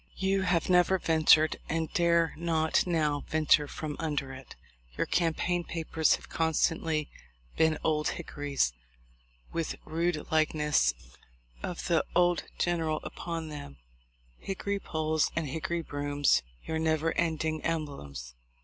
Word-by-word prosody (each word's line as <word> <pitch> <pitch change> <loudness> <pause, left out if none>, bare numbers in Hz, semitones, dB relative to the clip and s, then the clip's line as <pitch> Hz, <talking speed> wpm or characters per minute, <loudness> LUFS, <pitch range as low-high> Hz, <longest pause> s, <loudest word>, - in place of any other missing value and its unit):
You 195 0 +1
have 180 -3 +1
never 180 +1 +4
ventured, 160 -2 +4
and 160 0 -2
dare 170 -1 +3
not 160 0 +1
now 150 -4 +1
venture 155 -1 +3
from 155 -1 -5
under 145 -4 -2
it. 130 -1 -11 0.4
Your - - +1
cam 165 -2 +1
paign 175 -1 -1
papers 160 -1 +1
have - - -12
constantly 160 -1 0 0.5
been 160 -1 +3
'Old 150 -1 +1
Hickory's', 140 - -1 0.8
with 165 -1 -2
rude 165 0 -1
likeness 150 - +2 0.7
of 180 - -5
the 170 -2 +2
old 175 -1 +3
general 165 -3 0
upon 165 -2 -5
them; 105 - -8 0.6
hickory 200 +1 -3
poles 155 -3 0
and 160 -2 -1
hickory 165 +4 -2
brooms 145 - +1 0.2
your 160 0 -2
never 160 0 +1
ending 160 -2 -1
emblems. 70 - -4
160 Hz, 125 wpm, -29 LUFS, 150-170 Hz, 0.8 s, never